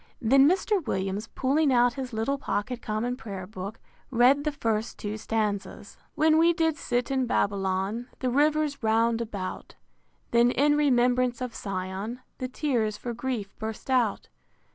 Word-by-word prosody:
Then 270 +4 +5
Mr. 385 +1 +1
Williams, 195 +3 -2
pulling 275 +4 +1
out 245 -1 +4
his 260 -1 -5
little 225 +5 -1
pocket 245 -1 -3
Common 225 +3 -2
Prayer 200 -6 -7
Book, 200 +2 -7 0.3
read 265 +3 +4
the 300 - +1
first 225 -5 -2
two 210 0 -4
stanzas: 210 -2 -3
I. - - -32
When 315 +1 +4
we 335 +1 +5
did 325 -2 +1
sit 250 -3 -2
in 260 -2 +1
Babylon, 200 +2 0
The 255 -1 -1
rivers 295 +1 +2
round 225 +1 +2
about; 200 -5 -6 0.6
Then 235 +1 +5
in 290 +4 +3
remembrance 250 -3 +2
of 250 -2 -5
Sion, 195 +4 -4 0.2
The 255 - -2
tears 245 -6 -1
for 240 +2 -5
grief 235 -4 -4
burst 220 +4 -5
out. 240 -6 +1
240 Hz, 155 wpm, -27 LUFS, 215-270 Hz, 0.6 s, Then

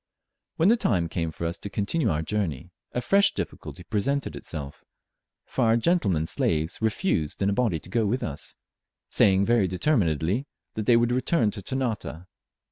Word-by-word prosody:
When 170 +2 +4
the 235 - +5
time 90 - +1
came 80 0 -2
for 85 - -5
us 85 +3 -3
to 100 - -6
continue 105 +12 0
our 80 0 0
journey, 90 -4 -3 0.2
a 125 - -2
fresh 200 - +4
difficulty 90 - -6
presented 110 - -1
itself, 70 0 -7 0.6
for 130 - 0
our 115 +1 +4
gentlemen 110 - +2
slaves 80 +2 -1
refused 110 - 0
in 100 - +2
a - - +1
body 110 -6 +1
to - - -12
go 110 +3 +1
with 125 +5 -1
us; 75 -2 -5 0.6
saying 95 -1 +4
very 115 -4 +3
determinedly 95 - +1 0.3
that 110 -1 -4
they 120 - +6
would 120 +1 +2
return 125 -2 +2
to 100 - -7
Ternate. 110 - -3
100 Hz, 170 wpm, -26 LUFS, 85-125 Hz, 0.6 s, they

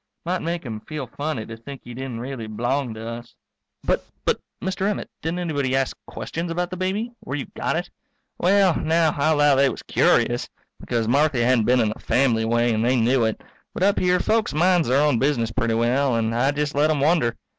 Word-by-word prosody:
Might 180 +2 -1
make 170 -1 -3
him 110 -3 -5
feel 150 +4 -6
funny 140 -2 -4
to 115 - -8
think 135 +4 -10
he 120 - -9
didn't 130 -2 -5
really 125 -3 -5
b'long 120 +3 -2
to 110 +1 -7
us. 115 +1 -8 0.5
But - - +1 0.2
but - - +1 0.2
Mr. 190 +2 -1
Emmett, 210 - -4
didn't 165 +2 -2
anybody 145 -7 -1
ask 135 -1 0
questions 165 +2 -5
about 175 +1 -2
the - - -3
baby 195 +6 -2
where 135 - -5
you 140 - -4
got - - -1
it? - - -2 0.5
Well, 190 -1 +4
now, 160 0 +2
I'll 155 +2 +2
'low 145 -1 +4
they 135 0 +4
was - - -7
curious, - - +2 0.3
because 115 -2 -2
Marthy 140 +1 +2
hadn't 120 -2 +3
been 125 0 +4
in 110 - +2
the 110 - -6
family 120 -4 +2
way 120 +1 +2
and 110 0 0
they 125 +2 +3
knew 120 0 +3
it. 110 - -2 0.3
But - - -1
up 200 +1 +3
here 180 0 +3
folks 220 -5 +1
minds 175 0 +3
their 135 +4 +3
own 145 -6 +2
business 125 -4 +1
pretty 115 -1 0
well, 125 +3 +2
and 115 0 0
I 120 +4 +2
jest 145 0 -1
let 145 +2 +3
them 155 -2 +1
wonder. 145 -5 +2
135 Hz, 215 wpm, -23 LUFS, 120-160 Hz, 0.5 s, Well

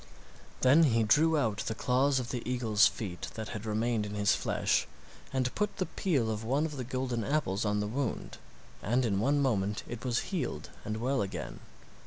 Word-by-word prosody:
Then 145 +6 +6
he 115 -5 +3
drew 155 +9 +4
out 110 -8 +1
the 110 - -2
claws 130 +4 +2
of 120 -2 -4
the 125 - -3
eagle's 115 -3 +4
feet 90 -5 -5
that 110 -1 -5
had 110 +1 -6
remained 110 +1 0
in 105 0 -5
his 105 -1 +3
flesh - - +1 0.4
and 130 -2 0
put 210 -1 -1
the 185 - 0
peel 135 -15 0
of 110 0 -4
one 135 +7 +1
of 150 -3 -5
the 130 - -3
golden 125 -2 -2
apples 120 -9 0
on 105 0 +1
the 105 - -1
wound, 125 +3 -3 0.4
and 120 +5 +1
in 100 -4 +1
one 140 +6 +2
moment 105 -5 0
it 120 -1 -7
was 125 -2 0
healed 160 - -3
and 110 +1 -2
well 130 +4 0
again. 95 - -5
120 Hz, 195 wpm, -31 LUFS, 105-135 Hz, 0.4 s, Then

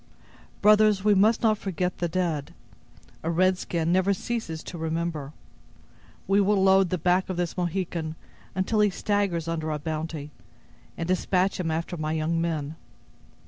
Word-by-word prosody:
Brothers, 210 -1 +5
we 210 0 +5
must 215 +4 +3
not 215 -2 +3
forget 180 -1 -2
the 175 - 0
dead; 165 -4 -2 0.7
a 165 - -2
red 185 +2 +2
skin 165 -1 -1
never 190 +2 +3
ceases 180 -8 -4
to 175 - -8
remember. 160 -3 -3 1.0
We 195 +2 +4
will 200 0 +3
load 190 -1 +5
the 185 - 0
back 180 +3 +1
of 185 - -3
this 175 -1 -2
Mohican 175 -3 -2 0.4
until 190 +3 0
he 210 0 +5
staggers 195 -4 -1
under 160 -1 -2
our 150 - -1
bounty, 155 -1 -4 0.7
and 165 - -3
dispatch 185 +1 +1
him 170 -3 -1
after 165 +2 -2
my 155 0 -2
young 160 +1 0
men. 160 -2 -2
175 Hz, 155 wpm, -26 LUFS, 160-195 Hz, 1.0 s, Brothers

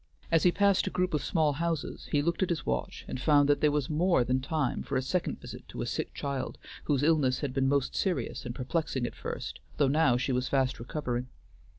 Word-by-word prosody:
As 165 -1 +5
he 180 - +5
passed 200 0 +3
a - - +2
group 180 -1 0
of 150 - 0
small 155 -4 +2
houses 165 0 -3
he 145 -1 +2
looked 170 +3 0
at 190 - +2
his 165 -5 -2
watch 60 -1 -3
and 130 - -5
found 145 -1 +5
that 145 -1 +3
there 150 - +5
was 145 -2 0
more 165 -2 +3
than 130 +2 +1
time 145 0 -1
for 135 - -2
a - - +1
second 175 +7 -1
visit - - -10
to - - -4
a - - -3
sick - - -3
child 140 -2 -3 0.3
whose 145 -2 +1
illness 145 -5 +3
had 140 -4 -2
been 135 0 +2
most 140 -1 +1
serious 185 -4 -1
and 120 -1 -5
perplexing 130 -1 -1
at - - -4
first, - - -5 0.2
though 145 - +4
now 135 -3 +4
she 135 +2 -1
was 125 0 0
fast 135 -2 +1
recovering. 125 -1 -3
145 Hz, 230 wpm, -30 LUFS, 130-160 Hz, 0.3 s, As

